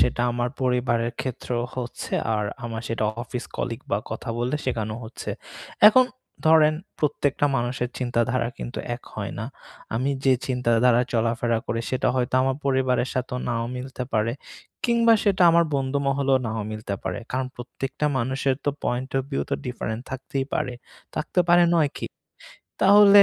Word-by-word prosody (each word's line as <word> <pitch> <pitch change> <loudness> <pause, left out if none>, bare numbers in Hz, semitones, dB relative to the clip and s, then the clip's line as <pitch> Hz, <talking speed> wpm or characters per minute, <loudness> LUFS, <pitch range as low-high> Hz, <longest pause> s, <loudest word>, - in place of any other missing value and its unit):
সেটা 120 - +2
আমার 120 0 0
পরিবারের 120 -2 +1
ক্ষেত্রেও 120 -1 -2
হচ্ছে 120 -2 -5 0.2
আর 105 -1 0 0.2
আমার 115 -1 -4
সেটা 115 -1 -1 0.2
অফিস 120 0 -5
কলিগ 115 -2 -3
বা 100 - +2
কথা 120 - -5
বললে 125 +5 0
শেখানো 110 -4 -1
হচ্ছে। 110 - -6 0.6
এখন 255 +4 +6 0.4
ধরেন 155 -1 +6 0.2
প্রত্যেকটা 145 -1 +1
মানুষের 120 +1 -1
চিন্তাধারা 120 -1 +1
কিন্তু 120 - -5 0.2
এক 125 - -11
হয় 100 -2 -4
না। 110 - -3 0.5
আমি 130 +5 +1
যে 135 - +6
চিন্তাধারায় 125 -1 +3
চলাফেরা 115 0 +1
করি 115 - -1
সেটা 130 - +1
হয়তো 125 0 0
আমার 130 0 +1
পরিবারের 130 -2 +2
সাথে 130 -1 -2
নাও 115 -1 0
মিলতে 130 0 -5
পারে। 110 +1 +2 0.5
কিংবা 235 -1 +5
সেটা 195 -3 +3
আমার 170 +1 +5
বন্ধুমহলেও 140 0 +1
নাও 110 0 -2
মিলতে 110 -2 -4
পারে। 95 -1 -3
কারণ 130 0 -1
প্রত্যেকটা 135 +4 -3
মানুষের 130 +2 +1
তো 145 - +3
পয়েন্ট 125 +2 -1
ওফ - - 0
ভিউ 135 - 0
তো - - +2
ডিফারেন্টস 120 -1 -4
থাকতেই 135 0 -3
পারে। 125 - -1 0.4
থাকতে 180 +3 0
পারে 175 0 +7
নয় 155 -4 +3
কি? - - -3 0.8
তাহলে 200 0 +9
125 Hz, 155 wpm, -25 LUFS, 120-135 Hz, 0.8 s, তাহলে